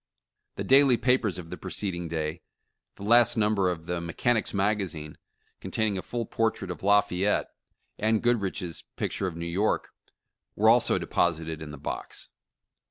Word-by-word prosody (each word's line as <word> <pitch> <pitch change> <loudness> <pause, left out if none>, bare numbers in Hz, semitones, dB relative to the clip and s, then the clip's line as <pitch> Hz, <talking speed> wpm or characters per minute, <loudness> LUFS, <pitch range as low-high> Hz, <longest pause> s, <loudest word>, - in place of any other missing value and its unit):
The - - -3
daily 135 -2 +6
papers 125 -7 +1
of 85 -2 -9
the - - -5
preceding 90 -4 -4
day 80 0 -3 0.3
— - - -55
the - - -10
last 120 +2 +5
number 105 -3 +2
of 85 -2 -4
the 90 0 -2
"Mechanics' 105 +7 0
Magazine," 95 -7 -1 0.4
containing 110 -2 -1
a 95 - -2
fuU 120 +3 -4
portrait 110 -4 -1
of 85 - -7
Lafayette 100 0 +2 0.3
— - - -45
and 110 +1 +2
Goodrich's 100 -7 -1
pic - - -2
ture 95 - -2
of 85 - -5
New 85 - -4
York 95 +6 0 0.3
— - - -56
were 110 +2 +4
also 120 +1 +4
deposited 80 -2 -1
in 80 - -7
the 75 - -8
box." 70 - -5
100 Hz, 165 wpm, -27 LUFS, 85-110 Hz, 0.4 s, daily